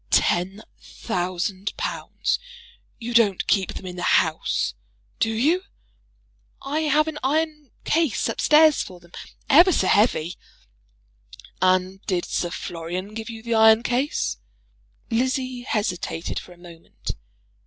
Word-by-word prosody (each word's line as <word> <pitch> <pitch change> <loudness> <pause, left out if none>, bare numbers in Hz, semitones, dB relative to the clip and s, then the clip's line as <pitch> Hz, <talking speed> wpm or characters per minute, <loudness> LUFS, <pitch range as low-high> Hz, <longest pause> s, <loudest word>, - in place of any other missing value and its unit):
"Ten 190 +4 +1 0.2
thousand 185 0 -3
pounds! - - -2 0.6
You 240 0 -5
don't 215 -5 +3
keep 190 -3 +1
them - - -7
in 180 -1 -7
the - - -5
house; 160 - +1 0.5
do 225 - +2
you?" 285 +12 +2 1.0
"I 290 +3 -1
have 305 0 +2
an 310 -1 -4
iron 300 +1 -1
case 320 -5 +1
up - - -3
stairs 310 0 +5
for 180 -2 -8
them; 175 0 -20 0.4
ever 345 +6 +7
so - - +2
heavy." 180 -6 +2 1.2
"And 185 +1 +2
did 180 -3 0
Sir 175 - -2
Florian 175 +4 -5
give 220 0 -6
you 225 -1 -8
the 235 0 -2
iron 220 0 +6
case?" 250 - -1 0.7
Lizzie 255 +1 0
hesitated 195 -8 -2
for - - -14
a 175 - -14
moment. 170 -1 -9
220 Hz, 130 wpm, -23 LUFS, 180-270 Hz, 1.2 s, ever